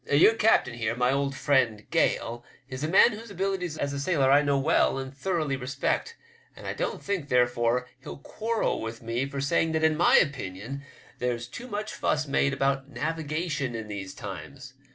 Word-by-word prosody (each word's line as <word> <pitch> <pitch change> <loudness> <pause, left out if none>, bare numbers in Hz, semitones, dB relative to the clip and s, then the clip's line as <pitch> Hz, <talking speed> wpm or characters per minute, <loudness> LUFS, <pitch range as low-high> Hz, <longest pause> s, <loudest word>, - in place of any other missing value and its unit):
Your 150 +10 +6
captain 220 - +3
here, 115 -1 -2
my 125 +1 +2
old 140 0 0
friend 125 -8 +1
Gale, 120 +1 0 0.2
is 130 +1 -6
a - - +1
man 190 +8 +6
whose 225 +2 -8
abilities 190 -4 -2
as 140 0 -2
a 140 - -3
sailor 140 -3 +2
I 145 +1 +6
know 140 -1 +1
well 135 0 +2
and 135 0 -6
thoroughly 155 -3 -1
respect, 140 - -2 0.4
and - - -12
I - - -2
don't - - -3
think, 185 -8 -2
therefore, 120 0 +2
he'll - - -9
quarrel 225 +10 -2
with 115 +1 -6
me 115 +4 -1
for 140 0 -5
saying 160 +3 +1
that 160 0 0
in 160 0 +4
my 170 +3 +5
opinion 130 - -1 0.4
there's 120 -1 -1
too 245 - -9
much 215 -2 -4
fuss 155 0 0
made 140 0 +1
about 135 0 0
navigation 155 -1 -2
in 110 -2 -6
these 95 -2 -6
times. 105 - -8
140 Hz, 185 wpm, -27 LUFS, 125-160 Hz, 0.4 s, Your